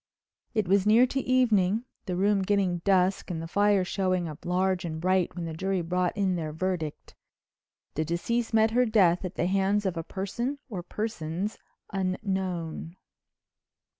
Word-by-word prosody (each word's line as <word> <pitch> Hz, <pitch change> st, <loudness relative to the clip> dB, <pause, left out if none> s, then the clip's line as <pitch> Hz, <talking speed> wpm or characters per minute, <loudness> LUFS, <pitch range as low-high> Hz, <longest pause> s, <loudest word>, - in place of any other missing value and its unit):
It 215 Hz, -4 st, +1 dB
was 195 Hz, +2 st, +3 dB
near 230 Hz, +4 st, +7 dB
to 270 Hz, +2 st, -2 dB
evening, 230 Hz, -5 st, +2 dB, 0.2 s
the 180 Hz, -, -1 dB
room 200 Hz, +2 st, +2 dB
getting 190 Hz, -2 st, +1 dB
dusk 190 Hz, +1 st, +2 dB
and 170 Hz, -3 st, -3 dB
the 165 Hz, -, -5 dB
fire 200 Hz, +1 st, +3 dB
showing 185 Hz, -2 st, 0 dB
up 155 Hz, +3 st, -9 dB
large 185 Hz, +1 st, +1 dB
and 160 Hz, -2 st, -4 dB
bright 185 Hz, +1 st, +1 dB
when 175 Hz, -2 st, -4 dB
the 165 Hz, -, -4 dB
jury 190 Hz, +2 st, -1 dB
brought 180 Hz, +3 st, -1 dB
in 195 Hz, -2 st, +2 dB
their 160 Hz, -3 st, -3 dB
verdict: 160 Hz, -2 st, -3 dB, 0.8 s
"The 155 Hz, -, 0 dB
deceased 225 Hz, +9 st, -1 dB
met 220 Hz, 0 st, +4 dB
her 250 Hz, +1 st, +3 dB
death 190 Hz, -6 st, +4 dB
at 185 Hz, 0 st, -5 dB
the 170 Hz, -, 0 dB
hands 195 Hz, +2 st, +1 dB
of 185 Hz, -3 st, -1 dB
a 165 Hz, -, -2 dB
person 235 Hz, -, -3 dB
or 195 Hz, -6 st, -4 dB
persons 195 Hz, -1 st, -4 dB, 0.3 s
unknown." 185 Hz, -4 st, -2 dB
190 Hz, 165 wpm, -28 LUFS, 175-205 Hz, 0.8 s, near